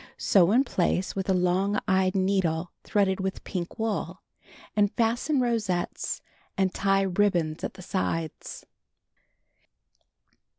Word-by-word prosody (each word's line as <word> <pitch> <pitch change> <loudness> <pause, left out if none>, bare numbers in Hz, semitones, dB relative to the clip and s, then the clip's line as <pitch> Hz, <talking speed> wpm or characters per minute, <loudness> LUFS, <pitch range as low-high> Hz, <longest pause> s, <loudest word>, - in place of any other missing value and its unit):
Sew 185 -3 +4
in 250 +5 +5
place 185 -5 0
with 195 -1 -3
a - - +4
long 185 +3 +1
eyed 190 -1 +2
needle 185 -3 +1
threaded 195 -2 +1
with 190 0 -3
pink 175 -3 -5
wool, 220 -2 -3 0.5
and 205 -1 +3
fasten 240 +5 +1
rosettes 220 -8 -1 0.3
and 190 -1 +1
tie 195 0 +2
ribbons 180 -5 +1
at - - -4
the 185 - -10
sides. 165 -4 -3
190 Hz, 120 wpm, -27 LUFS, 180-205 Hz, 0.5 s, in